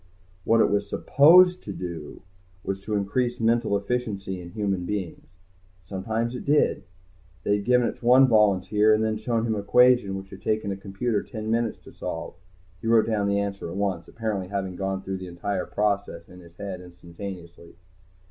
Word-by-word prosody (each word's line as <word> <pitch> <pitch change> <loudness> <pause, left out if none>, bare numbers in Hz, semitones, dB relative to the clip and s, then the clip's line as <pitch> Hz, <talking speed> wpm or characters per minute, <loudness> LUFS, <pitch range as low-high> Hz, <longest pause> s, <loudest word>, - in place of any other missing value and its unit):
What 115 0 +4
it - - +3
was 100 0 0
supposed 180 +5 +5
to 100 - -7
do 85 -5 -7 0.4
was 95 +1 -5
increase 110 +4 -1
mental 115 -2 +2
efficiency 100 -4 -3
in 85 - -9
human 100 -2 -2
beings. 95 -2 -5 0.6
Sometimes 110 +6 -3
it 125 - -6
did. 145 -8 +2 0.6
They 100 +1 +2
had 100 - -6
given 125 -1 +3
it - - -5
to - - -12
one 130 +2 +7
volunteer 105 -1 +4
and 110 - 0
then 110 0 0
shown 115 +1 -1
him 115 - 0
an 105 - -2
equation 120 -1 +4
which 95 0 -10
it - - -8
had - - -20
taken 110 -2 -1
a - - -2
computer 100 +3 -2
ten 110 -1 -5
minutes 115 -1 0
to - - -13
solve. - - -5 0.5
He - - -5
wrote 115 -1 +5
down 105 -3 0
the 100 0 +1
answer 100 -3 -3
at 85 - -6
once, 95 -4 -2
apparently 105 -5 -3
having 95 -1 -3
gone 95 +1 -3
through 95 0 -4
the 95 0 -8
entire 90 +2 -3
process 100 -5 -1
in 90 - -14
his 85 -1 -16
head 95 -3 -6
instantaneously. 85 -1 -10
100 Hz, 185 wpm, -25 LUFS, 95-115 Hz, 0.6 s, one